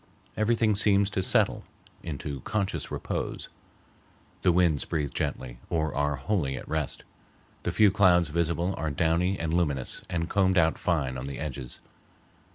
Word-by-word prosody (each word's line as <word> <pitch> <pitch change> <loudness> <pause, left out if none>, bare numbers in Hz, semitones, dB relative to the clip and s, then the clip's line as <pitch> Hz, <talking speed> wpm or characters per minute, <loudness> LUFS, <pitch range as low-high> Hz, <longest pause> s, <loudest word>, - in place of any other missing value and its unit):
Everything 110 -1 +2
seems 100 0 +3
to 95 - 0
settle - - +2 0.4
into 70 -3 -5
conscious 95 -6 -2
repose. - - -4 0.9
The 90 - +4
winds 85 -4 +3
breathe 75 -5 -2
gently 60 -2 -3
or 80 -1 0
are 75 +1 +1
wholly 70 -2 -1
at - - -9
rest. 80 -3 -2 0.6
The - - -2
few 105 -2 +5
clouds 90 -5 +4
visible 85 +3 0
are 80 +1 -1
downy 85 +6 +1
and 80 -1 -2
luminous 75 -7 0
and 85 -1 -1
combed 95 -1 +2
out 80 -2 +3
fine 70 -7 0
on 65 - -6
the 70 - -5
edges. 65 -5 -6
85 Hz, 150 wpm, -27 LUFS, 75-95 Hz, 0.9 s, few